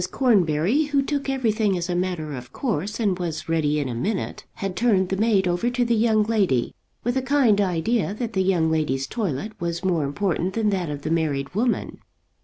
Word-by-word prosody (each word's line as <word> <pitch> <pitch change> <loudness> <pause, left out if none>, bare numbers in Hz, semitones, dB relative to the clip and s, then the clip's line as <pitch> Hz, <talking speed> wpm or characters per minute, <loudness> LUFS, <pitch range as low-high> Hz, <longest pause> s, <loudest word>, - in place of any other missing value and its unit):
Cornbury, 205 - +2
who 285 -1 +1
took 280 -1 -2
everything 220 -7 +1
as 175 0 -3
a 180 - -1
matter 175 -4 -2
of 125 -2 -8
course 210 - -2
and 200 -5 +1
was 170 -3 -4
ready 155 -2 +1
in 145 - -1
a 125 - -3
minute, 190 - -3
had 195 -2 -4
turned 195 -4 +2
the 190 - 0
maid 200 -2 +2
over 175 +7 +1
to 245 0 0
the 235 - +1
young 220 -1 +3
lady 195 - +1 0.3
with 245 +2 0
a - - +2
kind 260 -6 +3
idea 195 +4 0
that 230 0 -4
the 190 - +1
young 175 -4 +2
lady's 140 -4 0
toilet 200 - -3
was 170 +1 -3
more 175 -5 +1
important 180 +5 -1
than 220 -2 +1
that 180 -5 -1
of 145 -1 -5
the 155 - -2
married 150 -4 -1
woman. 230 +5 -1
190 Hz, 205 wpm, -24 LUFS, 160-225 Hz, 0.3 s, young